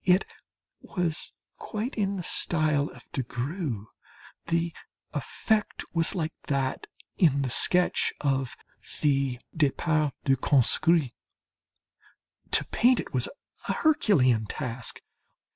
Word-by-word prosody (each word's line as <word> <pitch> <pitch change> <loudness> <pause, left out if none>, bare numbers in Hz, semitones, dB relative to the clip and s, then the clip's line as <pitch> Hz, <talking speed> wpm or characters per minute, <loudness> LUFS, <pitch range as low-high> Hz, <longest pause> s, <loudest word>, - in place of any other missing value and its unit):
It 185 +1 +4 0.5
was 175 -4 -3 0.3
quite 220 +4 -4
in 200 -2 -1
the 185 - -4
style 155 -4 +1
of - - -14
de 135 - -2
Groux; 125 - -4 0.6
the 170 0 0 0.4
effect 210 - -1
was 165 +3 +2
like 160 -3 -2
that 135 -2 -1 0.3
in 140 -6 +4
the 130 - -2
sketch 180 +7 +4
of 135 -3 -1 0.5
the 140 -4 +1 0.2
"Départ 155 -1 +1
du 135 -1 +3
Conscrit." 140 +3 +3 1.4
To - - +3
paint 245 +1 +3
it - - -6
was 125 -2 +2 0.4
a - - +1
herculean 130 - +3
task. 125 -3 -3
155 Hz, 110 wpm, -27 LUFS, 130-175 Hz, 1.4 s, It